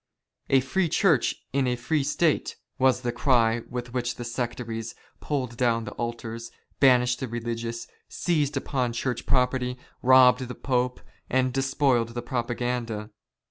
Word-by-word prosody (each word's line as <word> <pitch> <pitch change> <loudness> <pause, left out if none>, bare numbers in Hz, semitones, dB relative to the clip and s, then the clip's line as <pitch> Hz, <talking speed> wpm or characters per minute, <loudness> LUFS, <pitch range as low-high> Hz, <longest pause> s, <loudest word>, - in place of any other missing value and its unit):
" - - -44
A 135 -1 +5
free 170 +7 0
Church 160 - +3 0.2
in 135 -1 +2
a 125 - +1
free 135 +5 0
State," 155 +2 +1 0.2
was 130 -1 +3
the 120 -1 -1
cry 120 -2 +2
with 120 -1 -5
which 120 -1 -1
the 120 - -6
sectaries 120 -2 -4 0.2
pulled 130 -5 -3
down 115 -2 +2
the - - -6
altars, 115 -1 -5 0.3
banished 125 -2 +4
the 130 - -3
religious, 115 0 -4 0.2
seized 150 -5 0
upon 130 -3 -1
Church 120 0 -3
property, 125 -1 +1 0.2
robbed 130 0 +6
the 125 - -7
Pope, 125 -1 -1 0.3
and 130 0 +1
despoiled 135 -3 +1
the 120 - -3
Propaganda. 120 -3 -3
125 Hz, 145 wpm, -26 LUFS, 120-130 Hz, 0.3 s, robbed